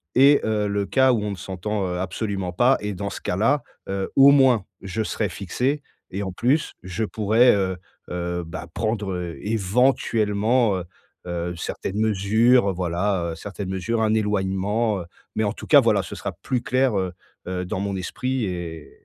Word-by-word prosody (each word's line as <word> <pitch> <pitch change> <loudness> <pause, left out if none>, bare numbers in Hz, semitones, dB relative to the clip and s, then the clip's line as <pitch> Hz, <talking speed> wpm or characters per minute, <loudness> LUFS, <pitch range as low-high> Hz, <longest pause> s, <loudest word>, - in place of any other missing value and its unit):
et 140 +3 +6
heu, 105 -1 0
le 100 0 -1
cas 130 -1 +4
où 110 - 0
on 105 - -2
ne - - -4
s'entend, 95 +2 -3
heu, 90 0 -3
absolument 95 0 -3
pas 120 +8 +4
et 105 -1 -3
dans 100 +2 -3
ce - - -7
cas-là, 115 +10 +1 0.3
heu, 95 0 -2
au 140 +1 +8
moins 130 -8 +4 0.2
je 100 +3 -3
serai 105 -1 -2
fixé 125 - -2 0.3
et 100 +2 -3
en 95 - -4
plus, 135 - +1
je 95 +4 -3
pourrais, 110 +4 +4
heu 95 -2 -1 0.3
heu, 90 0 -2
bah 80 - -7
prendre 95 -6 -2
éventuellement, 110 0 +2
heu 90 - -5 0.4
heu, 85 0 -3
certaines 95 +4 -4
mesures, 110 +1 +3
voilà, 90 0 -1
heu - - -8
certaines 100 +2 -6
mesures, 95 +5 -1
un 110 -1 +2
éloignement, 105 +1 0
heu, 85 - -8 0.3
mais 110 - +1
en 100 - 0
tout - - -10
cas - - +8
voilà, - - +3
ce - - -7
sera - - -5
plus 125 -2 0
clair, 130 -4 +1
heu 90 -1 -2 0.3
heu, 90 0 -2
dans 95 - -3
mon 100 -1 -2
esprit 125 +6 -2
et 85 -4 -6
100 Hz, 180 wpm, -23 LUFS, 95-115 Hz, 0.4 s, au